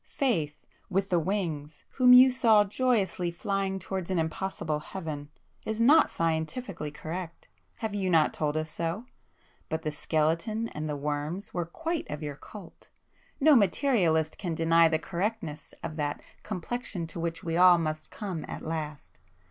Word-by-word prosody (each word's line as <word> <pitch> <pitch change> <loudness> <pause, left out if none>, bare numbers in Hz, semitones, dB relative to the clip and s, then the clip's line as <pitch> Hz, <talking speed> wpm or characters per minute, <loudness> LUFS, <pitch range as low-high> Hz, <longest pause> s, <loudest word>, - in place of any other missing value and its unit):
"Faith,—with 195 - -2
the 175 - +4
wings, 160 -5 -3
whom 250 -2 +5
you 255 +1 +9
saw 225 -5 +5
joyously 205 -5 0
flying 195 +2 -2
towards 190 -1 -4
an 185 - 0
impossible 160 -1 -2
Heaven, 150 -4 -6 0.3
is 220 0 -3
not 290 +7 +6
scientifically 165 - -2
correct,—have 170 +7 -7
you 195 -2 -1
not 160 -3 +4
told 150 0 -1
us 155 0 -3
so?—but 165 -2 -6
the 155 - -1
skeleton 165 +9 0
and 155 0 -5
the 150 - -2
worms 150 +6 -3
were 175 -1 -1
quite 325 - -4
of 150 +1 -5
your 145 -1 -4
cult! 190 +4 -13 0.5
No 305 0 +6
materialist 185 - +2
can 175 -4 -2
deny 165 +1 +5
the 160 0 +2
correctness 175 -3 -4
of 160 -1 -5
that 145 -1 -2 0.2
'complexion 210 -1 -4
to 165 +1 -6
which 165 0 -3
we 165 -1 -2
all 180 0 +7
must 155 -1 -3
come 185 -8 -5
at - - -7
last. 155 - -5
170 Hz, 150 wpm, -28 LUFS, 155-205 Hz, 0.5 s, you